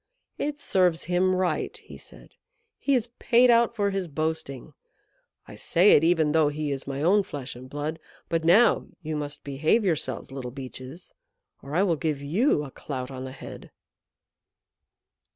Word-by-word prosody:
"It 290 0 -2
serves 180 - +2
him 180 +2 +1
right," 185 -1 -1
he - - -13
said. - - -13 0.5
"He 280 - +2
is 240 -1 0
paid 245 0 +5
out 235 0 +3
for 200 -3 0
his 195 -2 -2
boasting. 155 -3 -4 0.7
I - - -11
say 180 +5 +3
it, 160 -1 +4
though 160 -2 +4
he 150 0 -2
is 135 -1 -4
my 140 +1 -3
own 200 +5 +4
flesh 140 -9 -7
and 130 +1 -11
blood. 150 +3 -4 0.3
But 165 -1 -1
now 195 +9 +4 0.2
you 155 0 -3
must 145 -1 -5
behave 155 +10 +1
yourselves, 160 -6 -1
Little 135 -2 -6
Beeches, 130 +5 -9 0.5
or 140 +2 -7
I 185 - +4
will 170 -5 +1
give 150 -2 -2
you 155 - +1
a 140 - -8
clout 130 -2 -6
on 130 0 -6
the 130 - -7
head." 130 - -10
160 Hz, 165 wpm, -26 LUFS, 140-185 Hz, 0.7 s, paid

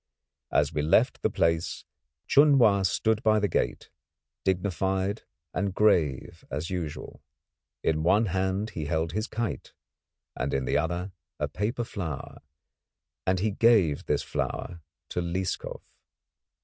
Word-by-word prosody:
As 75 +2 +2
we 75 - 0
left 75 +2 +3
the - - +2
place 85 0 0 0.4
Chun 145 0 +6
Wa 105 -6 +5
stood 110 +4 +1
by 110 -3 +4
the 105 -1 +2
gate, - - -2 0.5
dignified, 95 +2 0 0.3
and 95 0 -1
grave 85 -11 +2
as 75 +6 -4
usual. 85 -5 -5 0.6
In 80 -1 +1
one 105 +7 +4
hand 95 +2 -1
he 80 - -4
held 80 +1 -1
his 110 +5 -2
kite, 115 0 -4 0.6
and - - -2
in 65 -1 -1
the - - 0
other 85 +4 -1 0.3
a 75 - -1
paper 105 - -2
flower, 85 - -6 0.9
and 95 -1 +2
he 105 +1 +1
gave 100 -9 +3
this - - +1
flower 85 -1 -4 0.3
to 90 - -2
Lieskov. 90 +2 -3
95 Hz, 135 wpm, -27 LUFS, 80-105 Hz, 0.9 s, Chun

